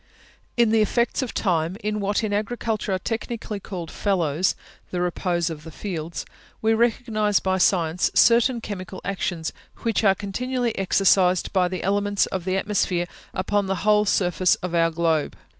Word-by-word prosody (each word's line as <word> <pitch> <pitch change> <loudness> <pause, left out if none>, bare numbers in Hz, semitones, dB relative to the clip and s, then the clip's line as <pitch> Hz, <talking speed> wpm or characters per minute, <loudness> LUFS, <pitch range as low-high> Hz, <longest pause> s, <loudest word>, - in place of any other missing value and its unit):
In 235 -2 +4
the 225 -1 +4
effects 235 +5 +1
of 260 - -3
time, 175 -2 0
in 210 0 -1
what 205 +2 0
in 210 -2 -1
Agriculture 215 0 -2
are 190 - +2
technically 225 0 -4
called 180 -5 -7
fallows 180 -4 0 0.3
the 180 - -3
repose 175 -1 0
of 150 -2 -8
the 165 - -9
fields 165 -1 -5 0.3
we 225 0 +2
recognise 220 -2 +1
by 190 0 0
science 175 -2 +2
certain 235 +1 +5
chemical 190 -3 -6
actions, 175 -4 -2 0.3
which 225 -2 +1
are 195 -2 +5
continually 240 +4 -2
exercised 185 -1 +3
by 185 -2 +3
the 185 -1 -4
elements 205 +1 +1
of 185 -2 -4
the 185 0 0
atmosphere 190 -3 0 0.3
upon 200 +1 0
the 190 - 0
whole 210 0 +4
surface 180 -2 +2
of 180 -1 -6
our 165 -1 +3
globe. 160 -2 0
195 Hz, 160 wpm, -24 LUFS, 180-215 Hz, 0.3 s, certain